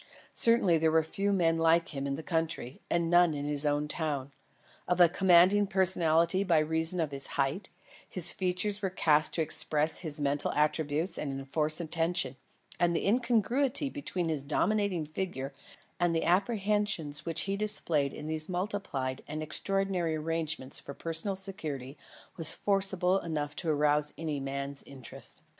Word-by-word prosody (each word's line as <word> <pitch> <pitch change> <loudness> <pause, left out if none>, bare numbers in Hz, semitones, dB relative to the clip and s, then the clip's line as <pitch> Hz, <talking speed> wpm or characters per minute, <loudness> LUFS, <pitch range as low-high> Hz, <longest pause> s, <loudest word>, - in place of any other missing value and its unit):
Certainly 215 -8 +3
there 160 0 +3
were 160 0 +3
but 160 - -17
few 200 +1 0
men 165 -4 +2
like 165 +1 +3
him 140 -2 -4
in 140 - -2
the 160 - -7
country, 160 -6 -2
and 170 -1 +1
none 175 -2 +4
in 145 0 -4
his 145 0 -1
own 145 0 0
town. 145 -4 -3 0.6
Of 180 0 0
a 175 - +8
commanding 190 +3 +4
personality 180 -1 +2
by 175 -4 +2
reason 160 +3 +1
of 160 -3 -1
his 140 -1 -1
height, 140 +8 -1 0.4
his 180 -3 -1
features 190 +3 0
were 195 - 0
of 185 - -7
a - - -26
cast 155 -2 +3
to 165 - +1
express 155 0 +2
his 155 -3 -3
mental 145 0 0
attributes 150 +3 0
and 140 - -3
enforce 150 +4 -2
attention, 165 -4 -1 0.4
and 170 0 +2
the - - -1
incongruity 250 +5 +1
between 185 - -3
his 155 -3 -1
dominating 180 +4 0
figure 155 -4 -5 0.5
and 175 -1 +1
the 165 - 0
apprehensions 200 - 0
which 165 -1 -1
he 195 0 -2
displayed 170 -9 +2
in 150 - -8
these 155 +1 -3
multiplied 180 -9 -3
and 155 +1 -4
extraordinary 185 0 -1
arrangements 155 -3 -2
for 140 - -9
personal 165 +4 -3
security 155 -9 -3 0.4
was 165 -2 +4
forcible 195 -2 +1
enough 150 -4 -4
to 170 - -2
arouse 150 0 +2
any 155 -3 -3
man's 140 +1 -5
interest. 130 -4 -6
165 Hz, 165 wpm, -30 LUFS, 150-190 Hz, 0.6 s, a